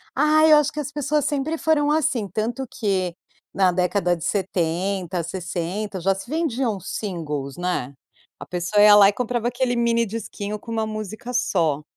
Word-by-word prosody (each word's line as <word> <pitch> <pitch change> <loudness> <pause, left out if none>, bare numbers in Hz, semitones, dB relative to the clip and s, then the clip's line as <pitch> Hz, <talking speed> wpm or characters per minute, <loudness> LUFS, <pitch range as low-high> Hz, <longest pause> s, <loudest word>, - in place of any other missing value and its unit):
Ai, 310 +2 +5
eu - - +9
acho 295 +1 +1
que 300 - -4
as 285 0 -5
pessoas 295 0 0
sempre 295 +3 -1
foram 295 -2 +2
assim, 255 -9 +1
tanto 230 +7 -3
que 185 -5 -1 0.4
na 190 -2 +3
década 180 0 +1
de 165 - -8
70, 185 -1 -1
60, 185 +3 -4
já 195 +3 +2
se 195 +4 -9
vendiam 265 - -1
singles, 150 -9 -4
né. 175 -7 -2 0.5
A - - -8
pessoa 180 +4 0
ia 210 0 +9
lá 200 -1 +8
e - - +2
comprava 240 0 -1
aquele 245 0 0
mini 235 -1 +2
disquinho 210 -1 -5
com 230 - -10
uma 220 -1 -1
música 215 +3 -6
só. 165 - +1
210 Hz, 170 wpm, -23 LUFS, 180-250 Hz, 0.5 s, eu